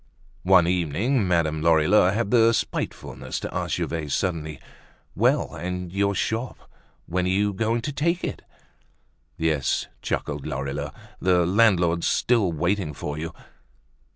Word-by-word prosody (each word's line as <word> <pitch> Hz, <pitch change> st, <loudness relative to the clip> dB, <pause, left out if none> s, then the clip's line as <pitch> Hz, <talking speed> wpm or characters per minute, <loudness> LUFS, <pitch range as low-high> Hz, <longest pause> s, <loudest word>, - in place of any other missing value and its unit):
One 90 Hz, -2 st, +5 dB
evening 90 Hz, -, +1 dB
Madame 80 Hz, -3 st, +1 dB
Lorilleux 85 Hz, +4 st, +4 dB
had 105 Hz, 0 st, -1 dB
the 115 Hz, -1 st, +5 dB
spitefulness -, -, -3 dB
to -, -, -5 dB
ask -, -, -1 dB
Gervaise 75 Hz, -4 st, -2 dB
suddenly: 80 Hz, -6 st, -2 dB, 0.5 s
"Well! -, -, +1 dB
And 90 Hz, +2 st, -5 dB
your 100 Hz, 0 st, +1 dB
shop, 110 Hz, +5 st, -2 dB, 0.5 s
when 90 Hz, +1 st, -1 dB
are -, -, 0 dB
you 100 Hz, +2 st, +1 dB
going 115 Hz, +4 st, 0 dB
to 145 Hz, -, -3 dB
take 170 Hz, +5 st, 0 dB
it?" -, -, -4 dB, 1.0 s
"Yes," 80 Hz, -4 st, 0 dB, 0.2 s
chuckled 75 Hz, 0 st, -3 dB
Lorilleux, 70 Hz, +1 st, -3 dB, 0.3 s
"the 90 Hz, -2 st, +3 dB
landlord's 90 Hz, -4 st, +3 dB
still 115 Hz, -7 st, +2 dB
waiting 85 Hz, 0 st, -1 dB
for 75 Hz, -, -4 dB
you." 80 Hz, +1 st, -4 dB
90 Hz, 130 wpm, -24 LUFS, 80-105 Hz, 1.0 s, One